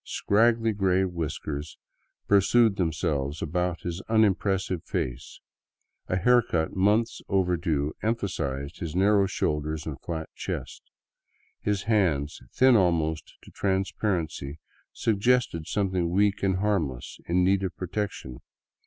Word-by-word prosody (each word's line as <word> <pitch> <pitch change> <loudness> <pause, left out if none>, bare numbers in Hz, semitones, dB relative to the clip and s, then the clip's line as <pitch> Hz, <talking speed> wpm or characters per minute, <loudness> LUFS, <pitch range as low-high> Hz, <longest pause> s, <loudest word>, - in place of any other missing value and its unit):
Scraggly 115 +2 +2
gray 95 -2 +2
whiskers 75 -3 -4 0.5
pursued 100 +2 +4
themselves 80 -4 -1
about 90 +2 -2
his 85 +1 -4
unimpressive 95 -5 +1
face; 65 +1 -4 0.7
a - - 0
haircut 95 -5 +2
months 105 +4 +2
overdue 85 -6 0
emphasized 75 - -2
his 85 -2 -5
narrow 100 +1 +4
shoulders 75 -2 -2
and 75 -4 -6
flat 80 -2 -4
chest. - - -5 0.8
His 100 -2 -1
hands, 85 -10 +1
thin 130 -1 +5
almost 80 -5 +1
to - - -15
trans 95 -1 -1
parency, 80 -8 -2 0.3
suggested 110 -6 +1
something 95 -4 0
weak 100 +3 +2
and 95 -1 +1
harmless 95 -11 -2
in 90 +1 +2
need 95 +1 +3
of 95 -3 -4
protection. 90 - -4
90 Hz, 115 wpm, -27 LUFS, 80-100 Hz, 0.8 s, thin